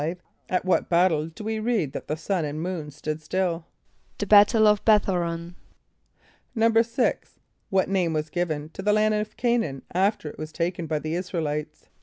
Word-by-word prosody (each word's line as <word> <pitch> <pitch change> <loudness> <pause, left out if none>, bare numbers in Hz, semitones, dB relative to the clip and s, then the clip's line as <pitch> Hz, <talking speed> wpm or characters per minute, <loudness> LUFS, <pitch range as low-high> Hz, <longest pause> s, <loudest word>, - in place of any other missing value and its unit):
= - - -43
At 180 0 0
what 185 - +1
battle 170 -3 +3
do 165 +6 -10
we 220 0 -2
read 215 - 0
that - - -6
the 155 - -2
sun 175 +2 -1
and 150 0 -4
moon 165 -3 -4
stood 155 +1 -5
still? 170 0 -2 0.5
=The 205 - -2
battle 210 +2 +6
of 210 -1 +4
B[)e]th=h[=o]´r[)o]n.= 175 -5 +1 1.0
=6.= 230 +2 +3 0.5
What 190 -1 +2
name 185 -4 +1
was 155 0 -2
given 155 -4 -2
to 195 - -8
the 210 +2 +2
land 215 0 +3
of 210 0 -2
C[=a]´n[)a]an 235 - 0
after 190 -1 +1
it - - -9
was 155 0 -6
taken 170 0 -2
by 155 0 0
the 155 +2 -4
[)I][s+]´ra 180 -1 -3
el 155 - -1
[=i]tes? 150 +1 -5
180 Hz, 185 wpm, -25 LUFS, 155-210 Hz, 1.0 s, battle